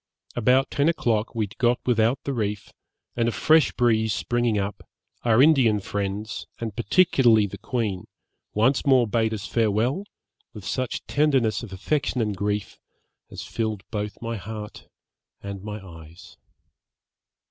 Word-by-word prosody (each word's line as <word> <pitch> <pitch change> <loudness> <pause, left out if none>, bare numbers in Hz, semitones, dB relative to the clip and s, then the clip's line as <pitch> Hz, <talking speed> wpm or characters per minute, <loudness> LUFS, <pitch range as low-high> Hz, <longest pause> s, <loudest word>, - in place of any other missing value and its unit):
About 125 +3 +3
ten 145 +2 +2
o'clock 115 -9 0
we 110 - +1
had 100 - -15
got 120 0 +3
without 115 +1 +2
the 140 - -2
reef, 105 -4 -3 0.4
and 115 -1 +1
a - - -1
fresh 155 +7 +4
breeze 110 -3 +2
springing 115 +4 0
up, 100 0 -3 0.4
our 120 +2 +5
Indian 130 -9 +4
friends, 100 +2 -4
and 115 -2 -5
particularly 120 - +4
the 100 -1 -8
queen, 110 -5 -2 0.5
once 130 +6 +3
more 130 -3 +4
bade 110 +1 +1
us 105 -1 -4
farewell, 115 - 0 0.5
with 105 -3 -10
such 130 -2 -3
tenderness 135 -7 +2
of 120 -5 -9
affection 130 +7 -1
and 105 -3 0
grief, 105 +1 -3 0.5
as - - -7
filled 110 -3 -3
both 105 -2 -4
my 115 0 -3
heart 105 +2 -8 0.6
and 100 -1 -6
my 105 +1 -6
eyes.' 85 +2 -13
110 Hz, 145 wpm, -24 LUFS, 105-125 Hz, 0.6 s, our